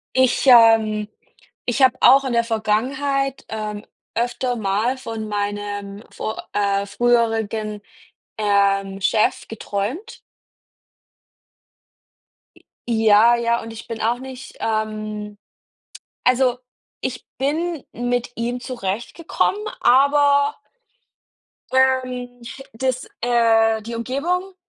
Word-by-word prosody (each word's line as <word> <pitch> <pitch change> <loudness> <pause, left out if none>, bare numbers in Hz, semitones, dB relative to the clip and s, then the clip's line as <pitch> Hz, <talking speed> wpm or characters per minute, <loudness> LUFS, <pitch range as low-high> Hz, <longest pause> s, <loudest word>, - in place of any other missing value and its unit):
Ich, 260 +1 +3
ähm 225 -3 +6 0.6
ich 245 +3 -1
habe 255 -1 +5
auch 270 +2 +6
in 255 - -2
der 235 0 +3
Vergangenheit, 265 +5 -1
ähm, 215 -1 -5 0.3
öfter 245 +1 -1
mal 215 +4 0
von 225 -4 -6
meinem 205 0 -4
vor 220 - -5
äh, 200 -1 +1
früheren, 225 -2 0 0.6
ähm, 200 -2 +1
Chef 215 +2 +1
geträumt. 225 - -5 2.4
J - - -22 0.3
ja, 220 +1 +5
ja, 235 0 0
und 225 - -8
ich 225 +1 -10
bin 225 -2 -6
auch 235 +3 0
nicht, 265 0 -10
ähm 215 -1 -3 0.9
also, 250 0 +3 0.4
ich 250 -1 -4
bin 310 +3 -1
mit 245 +1 -2
ihm 240 +2 -2
zurechtgekommen, 240 - -2 0.2
aber 285 +2 +4 1.2
ähm, 255 -2 +1
ch 265 +3 -9
das 255 +2 -2 0.2
äh, 225 -2 +3
die 230 +1 -7
Umgebung 345 +11 -2
235 Hz, 100 wpm, -21 LUFS, 215-260 Hz, 2.4 s, ähm